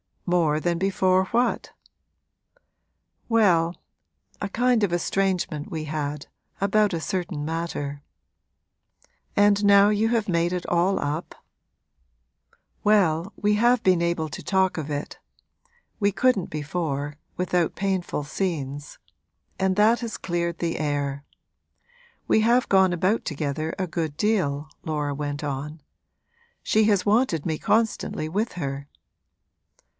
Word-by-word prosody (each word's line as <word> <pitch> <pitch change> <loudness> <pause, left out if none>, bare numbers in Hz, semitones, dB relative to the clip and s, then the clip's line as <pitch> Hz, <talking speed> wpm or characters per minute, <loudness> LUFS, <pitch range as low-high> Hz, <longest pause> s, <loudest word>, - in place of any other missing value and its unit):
'More 165 -4 +2
than 170 0 0
before 190 -1 +2
what?' 240 +5 0 1.5
'Well, 180 -7 +3 0.7
a 205 - -1
kind 245 +2 +2
of 200 -4 +1
estrangement 180 -3 -1
we 160 -1 -4
had, 150 -1 -4 0.3
about 205 0 +2
a 165 - -2
certain 175 -4 -3
matter.' 155 -3 -4 1.3
'And 205 0 +4
now 200 0 +6
you 210 +1 +2
have 230 -3 0
made 170 0 +1
it 180 -1 -3
all 180 +3 +2
up?' 150 +4 -3 1.5
'Well, 195 -3 +2
we 210 0 +1
have 240 +2 +3
been 185 -2 +3
able 170 -2 0
to - - -7
talk 190 -2 +1
of 155 -2 -4
it 145 0 -5 0.8
(we 200 -2 +2
couldn't 250 -7 +2
before 145 -2 -3 0.2
without 180 -2 0
painful 190 -6 -1
scenes), 145 -4 -4 0.6
and 190 0 +1
that 215 +4 +4
has 230 -2 -5
cleared 170 -1 -2
the 170 -1 -2
air. 145 -2 -2 1.0
We - - +4
have 235 +3 +3
gone 190 -2 +4
about 185 +6 +1
together 155 0 -3
a 190 - -1
good 160 -3 -3
deal,' 155 -6 0
Laura 150 -2 -2
went 145 +1 -4
on. 145 +2 -4 0.8
'She 215 0 +3
has 200 -4 +2
wanted 205 - +2
me 160 -2 -1
constantly 220 -8 0
with 210 +7 -1
her.' 140 -4 -4
175 Hz, 125 wpm, -25 LUFS, 155-200 Hz, 1.5 s, now